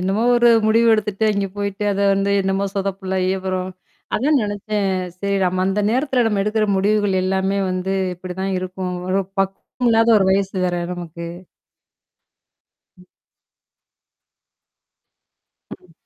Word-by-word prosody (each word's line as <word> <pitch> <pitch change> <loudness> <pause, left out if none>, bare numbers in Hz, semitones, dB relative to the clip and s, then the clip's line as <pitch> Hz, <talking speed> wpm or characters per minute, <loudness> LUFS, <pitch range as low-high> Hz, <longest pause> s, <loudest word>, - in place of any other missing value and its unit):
என்னமோ 195 +4 0
ஒரு 240 0 +5 0.2
முடிவு 230 +2 +4
எடுத்துட்டு, 215 0 0
அங்க 200 -1 -1
போயிட்டு, 200 0 -3
அத 195 - -2
வந்து 195 +1 0
என்னமோ 195 +1 0
சொதப்பல் 195 -1 -3
ஆயி, 185 0 +1
அப்பறம் 185 0 -3 0.4
அதான் 285 +4 +2
நெனச்சேன், 205 0 -2 0.3
"சரி 200 0 -1
நம்ம 185 +1 0
அந்த 195 +2 0
நேரத்துல 255 -1 +1
நம்ம 210 -3 +1
எடுக்குற 215 0 +1
முடிவுகள் 200 -1 +1
எல்லாமே 190 +1 0
வந்து, 185 +1 -2 0.2
இப்பிடி 180 0 -8
தான் 195 0 -1
இருக்கும், 185 0 -4 0.2
ஒரு 190 +1 +2 0.2
பக்குவம் 195 +5 -2
இல்லாத 225 0 +4
ஒரு 190 - +2
வயசு 195 0 0
வேற, 175 0 -1
நமக்கு." 170 -1 -7 1.7
ம். 180 0 -19 2.7
ம். 180 -2 -18
195 Hz, 130 wpm, -20 LUFS, 185-210 Hz, 2.7 s, ஒரு